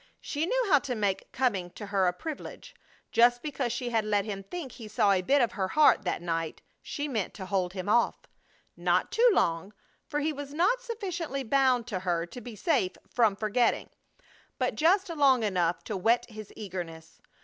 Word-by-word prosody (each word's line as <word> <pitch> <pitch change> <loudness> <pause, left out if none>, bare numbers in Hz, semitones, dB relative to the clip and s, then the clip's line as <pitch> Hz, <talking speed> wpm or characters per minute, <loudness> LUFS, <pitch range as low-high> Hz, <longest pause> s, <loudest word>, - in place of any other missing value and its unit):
She 310 +3 -2
knew - - +1
how 295 -7 +5
to 265 -2 -4
make 205 -3 -1
coming 205 -9 0
to 210 - -8
her 200 -2 +1
a - - +3
privilege. 305 - -8 0.4
Just 240 +1 +4
because 275 -5 -2
she 240 0 -3
had 225 -2 +2
let 205 -1 +1
him 200 -3 -4
think 280 - -7
he 225 -2 -10
saw 210 -1 +2
a 190 -2 +3
bit 275 +8 +3
of 235 - 0
her 190 -2 -2
heart 295 -3 +4
that 175 -1 -2
night, 165 -2 -3 0.2
she 290 -1 -4
meant 225 -9 -3
to 190 - -6
hold 185 -2 -1
him 185 0 -5
off. 235 +3 +3 0.6
Not - - +1
too 480 +2 +5
long, 170 - 0 0.3
for 295 - -2
he 305 +1 0
was 285 0 -7
not 390 +10 +2
sufficiently 360 - -4
bound 260 -1 +2
to 210 -6 -3
her 175 -2 -1
to 210 +8 -10
be 235 -1 -9
safe 245 - +1 0.2
from 225 -5 +3
forgetting, 215 +3 0 0.7
but - - 0
just 370 +6 +3
long 275 -7 +3
enough 180 -4 0
to 215 - -4
whet 225 +7 +2
his 215 -1 -9
eagerness. 175 -5 -7
230 Hz, 195 wpm, -28 LUFS, 190-285 Hz, 0.7 s, how